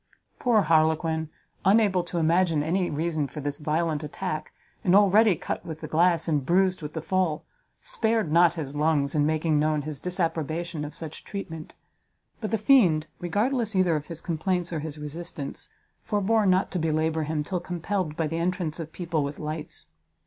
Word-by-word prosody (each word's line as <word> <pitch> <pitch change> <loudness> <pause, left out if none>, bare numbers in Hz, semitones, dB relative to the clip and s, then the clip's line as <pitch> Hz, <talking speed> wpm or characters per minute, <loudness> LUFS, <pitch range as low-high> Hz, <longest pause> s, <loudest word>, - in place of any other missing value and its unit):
Poor 235 -4 +4
Harlequin, 160 0 +2 0.3
unable 195 -2 +4
to 175 0 -5
imagine 165 -1 +2
any 175 +3 0
reason 155 -1 -1
for 150 - -8
this 145 0 -3
violent 155 0 0
attack, 155 0 -4 0.3
and 180 0 +4
already 205 0 +6
cut - - -4
with 160 -2 -7
the 155 - -5
glass, 170 +1 +2
and 150 -4 +1
bruised 185 +4 +2
with 150 0 -6
the 160 - -4
fall, 185 -5 0 0.4
spared 225 - 0
not 170 +1 +5
his 145 -4 -5
lungs 145 -2 +1
in 150 -1 +2
making 155 -1 +1
known 155 -1 +1
his 150 -2 -5
disapprobation 165 -2 -2
of 150 +1 -7
such 160 -2 -7
treatment: 165 -6 -7 0.7
but 215 - -3
the 225 - +1
fiend, 200 - +4
regardless 220 +5 0
either 185 -3 +3
of 150 -1 -4
his 165 -1 -6
complaints 175 +1 -1
or 160 - -1
his 150 0 -6
resistance, 150 -1 -6 0.3
forbore 210 0 +2
not 185 0 +2
to 185 - -1
belabour 160 0 0
him 150 0 -1
till 180 +3 -2
compelled 175 -1 -3
by 165 - +1
the 165 +2 -2
entrance 175 -2 -1
of 160 -1 -6
people 165 -4 -2
with 140 +1 -4
lights. 155 0 -5
165 Hz, 175 wpm, -26 LUFS, 155-185 Hz, 0.7 s, already